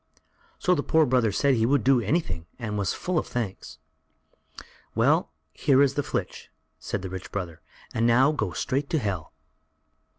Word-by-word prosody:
So 180 - +2
the 150 - +1
poor 160 +1 +3
brother 125 -5 +2
said 140 +6 +2
he 115 -3 +2
would 140 -3 +2
do 130 -2 +4
anything 100 - -1
and 110 -4 -4
was 100 -2 0
full 180 -3 -1
of - - -5
thanks. 115 -6 -5 1.2
"Well, - - +3 0.2
here 140 0 +4
is 140 -1 +2
the 145 - 0
flitch," - - -4 0.3
said 100 - -4
the 95 - -4
rich 95 0 -7
brother, 85 -5 -5 0.3
"and 115 +1 +2
now 130 +5 +5
go 110 -11 -2
straight 140 +8 -2
to 160 - +1
Hell." 100 - -3
120 Hz, 170 wpm, -26 LUFS, 100-140 Hz, 1.2 s, now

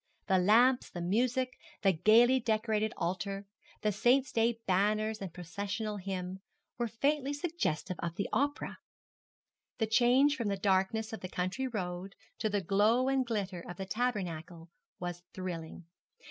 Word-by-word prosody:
The 190 -2 +3
lamps, 240 +7 +4
the 175 - -7
music, 250 +8 +1 0.3
the 195 - +6
gaily 230 +9 +5
decorated 220 -2 0
altar, 195 +3 -2 0.4
the 210 - +2
Saint's 255 +6 +3
day 230 0 +1
banners 215 +3 +1
and 190 -3 -5
processional 200 +5 -4
hymn, 185 -1 -4 0.4
were 240 - +1
faintly 280 +5 0
suggestive 285 - -2
of 170 -1 -3
the 200 - -2
opera. 285 +2 0 1.0
The 225 - +1
change 250 +6 +4
from 235 -5 -2
the 200 -1 0
darkness 195 +3 +1
of 220 - -4
the 185 - -6
country 185 +11 -2
road 185 -4 -4 0.2
to 215 - 0
the 205 -1 0
glow 215 +7 +3
and 270 -1 +2
glitter 200 -7 -3
of 175 - -7
the 190 - -4
tabernacle 180 -7 -3 0.3
was 175 -1 -4
thrilling. 175 -2 -6
210 Hz, 145 wpm, -32 LUFS, 185-240 Hz, 1.0 s, the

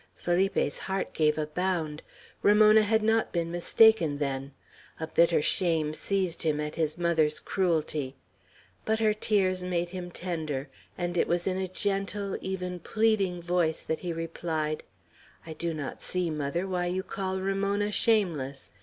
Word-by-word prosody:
Felipe's 175 -4 0
heart 190 0 -2
gave 150 -1 +2
a 155 - 0
bound; 160 -2 -2 0.4
Ramona 215 +1 +6
had 220 +1 +2
not 225 +1 +2
been 170 -1 -1
mistaken, 175 -2 +4
then. 135 -1 -3 0.5
A 160 - -2
bitter 165 -1 +3
shame 160 -4 +1
seized 185 0 -1
him 155 -2 +1
at 150 0 -3
his 155 -1 -1
mother's 160 -3 +2
cruelty. 155 -7 -1 0.7
But 220 0 +1
her 215 -1 +3
tears 195 -4 +1
made 175 -1 -2
him 180 -1 -5
tender; 155 -6 -4 0.3
and 175 0 -2
it - - +2
was 175 0 0
in 185 -1 0
a 190 0 -1
gentle, 195 +1 -2
even 180 -1 -4
pleading 200 -3 +1
voice 170 -2 0
that 160 - -2
he 175 - -4
replied: 160 -2 -3 0.6
"I 160 - -6
do 170 +1 -2
not 150 -4 -5
see, 180 -2 -1
mother, 155 +5 -2
why 180 -2 -1
you 185 +2 -1
call 190 -1 -3
Ramona 200 +2 0
shameless. 165 - 0
175 Hz, 155 wpm, -28 LUFS, 155-195 Hz, 0.7 s, Ramona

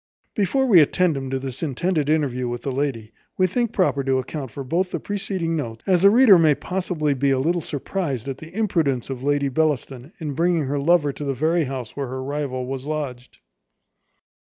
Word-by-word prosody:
Before 245 +6 +1
we 205 -9 +7
attend 165 +2 +3
him 135 -1 -4
to 135 - -1
this 130 -1 -6
intended 155 +1 -1
interview 135 -5 0
with 120 0 -5
the 135 - -2
lady, 125 -5 -3 0.2
we 185 - +4
think 235 +5 0
proper 180 -10 +1
to 135 -1 +2
account 135 +1 -4
for 140 - -7
both 175 +8 0
the - - -3
preceding 190 -5 -2
notes, 115 -7 -5
as 180 -3 +3
the 200 - +8
reader 220 -4 +7
may 155 -3 +4
possibly 175 -5 -1
be 140 +1 0
not 135 - +2
a - - 0
little 170 +4 +1
surprized 145 - -3
at 135 -1 -5
the 160 +1 -11
imprudence 165 - 0
of 130 -2 -5
Lady 145 0 +1
Bellaston, 140 -1 -1
in 150 -4 -4
bringing 170 +1 +1
her 140 +1 -2
lover 150 -1 +3
to 150 - -7
the 140 -1 -2
very 160 +4 +1
house 130 -4 -6
where 140 -2 -3
her 130 +1 -5
rival 135 -2 -3
was 135 +1 -5
lodged. 140 -5 -5
145 Hz, 205 wpm, -23 LUFS, 135-175 Hz, 0.2 s, the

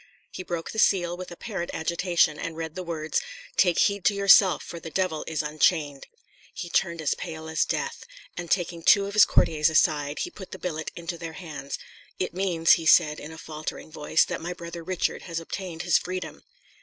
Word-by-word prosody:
He - - -6
broke 170 -2 -4
the 220 - -4
seal 175 -5 +3
with 185 0 -8
apparent 175 0 -5
agitation, 170 -1 +1
and 165 -1 -5
read 160 -1 -4
the 185 - -5
words, 160 -3 -2 0.3
"Take 180 -3 +3
heed 200 -3 +2
to 205 - +4
yourself, 200 -1 +6
for 170 - -8
the 165 - -8
devil 180 -3 -1
is 155 -2 -1
unchained." 150 -1 +1 0.5
He 175 - -5
turned 170 -3 0
as 150 - +2
pale 160 -2 -7
as 160 0 +1
death; - - -3 0.3
and 175 -1 -6
taking 175 -2 0
two 200 +4 +5
of 200 - -6
his 210 -2 +8
courtiers 155 0 +3
aside, 150 -2 +2
he 355 - -3
put 190 - -10
the - - -6
billet 160 -3 -4
into 170 0 -5
their 165 -1 -6
hands. 155 -5 -6 0.4
"It 185 - -2
means," 175 -3 +2
he 165 -1 +4
said 155 -3 +5
in 150 - -9
a 160 - -10
faltering 155 0 -7
voice, 150 +1 +2
"that - - -4
my 175 +2 -4
brother 170 -1 -8
Richard 185 +1 -1
has 165 0 -2
obtained 170 0 -6
his 175 -2 +4
freedom." 185 +1 -6
170 Hz, 200 wpm, -26 LUFS, 160-185 Hz, 0.5 s, his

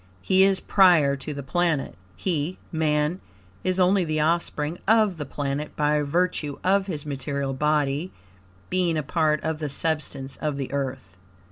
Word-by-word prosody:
HE 190 0 +4
IS 195 -1 +3
PRIOR 170 -8 +5
TO 140 +2 -6
THE 140 -1 -5
PLANET. 165 - 0 0.2
He 170 -1 -2
(Man) 155 +2 0 0.4
is 185 0 0
only 185 +1 +4
the 155 -2 -1
offspring 160 0 0
of 215 -4 +4
the 150 -3 -5
planet 145 +1 -3
by 150 0 +2
virtue 150 -1 -1
of 195 +1 +2
his 155 -5 -4
material 140 -1 -3
body 150 +3 0 0.6
being 180 -3 +1
a 155 - -1
part 155 +1 +1
of 160 -1 -2
the 150 -2 -3
substance 140 -2 -2
of 150 -2 -2
the 135 -2 -4
Earth. 130 -9 -4
155 Hz, 155 wpm, -25 LUFS, 140-175 Hz, 0.6 s, PRIOR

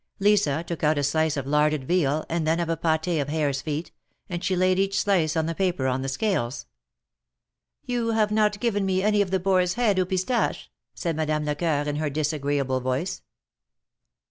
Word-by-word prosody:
Lisa 195 -7 +2
took 170 -2 -5
out 150 0 +3
a 145 - 0
slice 155 +1 +1
of 135 - -3
larded 150 0 +2
veal, 155 -1 +1
and 165 -1 -1
then 165 +2 +2
of 170 -1 -1
a 165 - +1
pat4 160 0 0
of 140 - -4
harems 145 -3 0
feet, 155 +2 -4 0.4
and 175 -1 -4
she 185 - +1
laid 185 +1 +2
each 195 +1 +1
slice 170 -7 +1
on 160 - +1
the 165 - -2
paper 180 -6 -1
on 130 0 0
the 135 - -3
scales. 135 - -1 1.2
You 240 -2 -1
have 220 -2 +1
not 210 -1 +2
given 205 -4 0
me 190 0 0
any 210 0 +3
of 200 - 0
the 190 0 +1
boar's 185 -1 +2
head 220 -6 +2
aux 185 - +2
pistaches," 190 +6 -1 0.3
said 170 -3 -2
Madame 155 -1 -1
Lecceur, 150 0 0
in 145 0 -2
her 155 -1 -1
disagreeable 145 -3 -1
voice. 130 +8 -2
165 Hz, 195 wpm, -25 LUFS, 150-190 Hz, 1.2 s, out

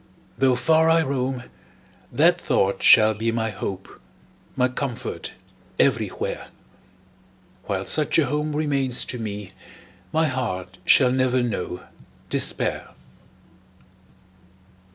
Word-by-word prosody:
Though 130 -2 +2
far 160 +6 +3
I 165 0 +4
roam, 130 -3 -2 0.7
that - - +3
thought 95 0 0
shall 110 0 +7
be 110 +2 -2
My 110 -1 -2
hope, 95 -6 -7 0.5
my 125 - +2
comfort, 125 -2 -5 0.4
everywhere; - - -1 1.2
While 95 -2 -3
such 155 -1 +2
a 160 - +4
home 150 +3 -2
remains 140 -5 +1
to 125 - -5
me, 105 -3 -6 0.6
My 160 0 +2
heart 95 - -4
shall 130 -3 +5
never 130 -1 +1
know 95 -6 -4 0.5
despair! - - -1
125 Hz, 105 wpm, -23 LUFS, 105-140 Hz, 1.2 s, shall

